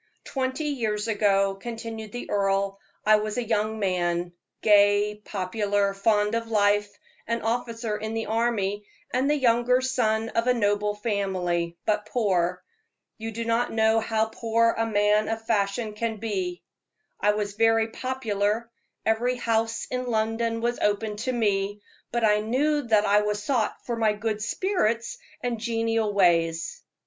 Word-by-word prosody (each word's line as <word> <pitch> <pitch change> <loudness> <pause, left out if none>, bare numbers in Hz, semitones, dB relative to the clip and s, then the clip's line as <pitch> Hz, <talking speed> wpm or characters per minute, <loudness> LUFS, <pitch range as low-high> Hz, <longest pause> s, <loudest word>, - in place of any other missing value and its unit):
"Twenty 260 +2 -2
years 225 -7 -1
ago," 200 -2 +2
continued 225 +1 -7
the 245 - -6
earl, 195 0 +1 0.3
"I 215 0 +6
was 215 +1 -3
a 245 - 0
young 220 -1 0
man, 175 -3 -1 0.3
gay, 205 0 +4
popular, 200 +1 -1
fond 210 +1 +2
of 230 0 -1
life, 205 -1 +2 0.3
an 230 +1 -1
officer 230 -1 -2
in 220 +1 -4
the 225 - -2
army, 210 -3 -1 0.3
and 260 +3 +1
the 300 - +3
younger 245 -1 +3
son 225 -4 0
of 230 +2 -1
a 250 - +4
noble 205 -2 +1
family, 185 -5 -1
but 210 0 0
poor. 180 -6 0 0.6
You 225 +1 -4
do 230 +1 -4
not 230 +1 +1
know 220 0 +3
how 220 0 +1
poor 230 0 +2
a 225 0 0
man 210 0 +2
of 225 0 -3
fashion 210 +1 0
can 225 +1 -2
be. 190 -5 -3 0.6
I 210 - +3
was 205 -1 -2
very 225 +1 +3
popular 225 -3 -2 0.3
every 235 +3 +1
house 230 -1 0
in 250 0 -2
London 225 0 0
was 240 +1 -1
open 210 +1 0
to 255 +4 -2
me 205 -3 0 0.3
but 235 0 -1
I 210 -1 +4
knew 280 +8 +1
that 215 -2 +4
I 205 +1 +4
was 210 0 -2
sought 235 -3 -1
for 240 - -2
my 220 -2 +2
good 215 0 -3
spirits 235 - -1 0.2
and 240 -2 -2
genial 225 -1 0
ways. 170 - +2
220 Hz, 155 wpm, -26 LUFS, 205-230 Hz, 0.6 s, I